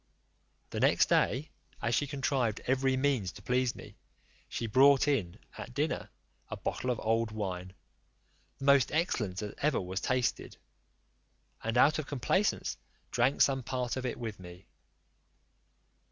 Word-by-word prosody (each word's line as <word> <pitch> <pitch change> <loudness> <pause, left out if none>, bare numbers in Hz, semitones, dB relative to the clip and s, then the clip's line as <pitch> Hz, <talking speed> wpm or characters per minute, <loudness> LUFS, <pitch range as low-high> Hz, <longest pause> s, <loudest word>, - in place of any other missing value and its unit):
The - - -3
next - - +4
day, 145 +5 +1 0.3
as 115 - -1
she 145 +5 +1
contrived 135 -5 0
every 130 0 +2
means 130 -9 +1
to - - -12
please 125 -1 +1
me, - - -12 0.5
she 115 - -3
brought 135 +5 +5
in, 105 -10 0 0.2
at 120 - -8
dinner, 150 +3 -1 0.4
a - - -5
bottle 130 - -3
of 120 - 0
old 115 +1 +1
wine, 95 -4 -5 0.8
the 135 - -6
most 140 -3 +5
excellent 125 - 0
that 105 0 -6
ever 150 -2 +1
was 95 +1 -4
tasted, 130 -2 -1 1.1
and 115 +2 -1
out 150 +5 +5
of 150 - -4
complaisance 150 - 0 0.3
drank 125 +3 +3
some 135 -1 +1
part 125 -1 -2
of 130 - -4
it - - -4
with 110 -4 -6
me. 90 0 -12
125 Hz, 145 wpm, -31 LUFS, 110-140 Hz, 1.1 s, brought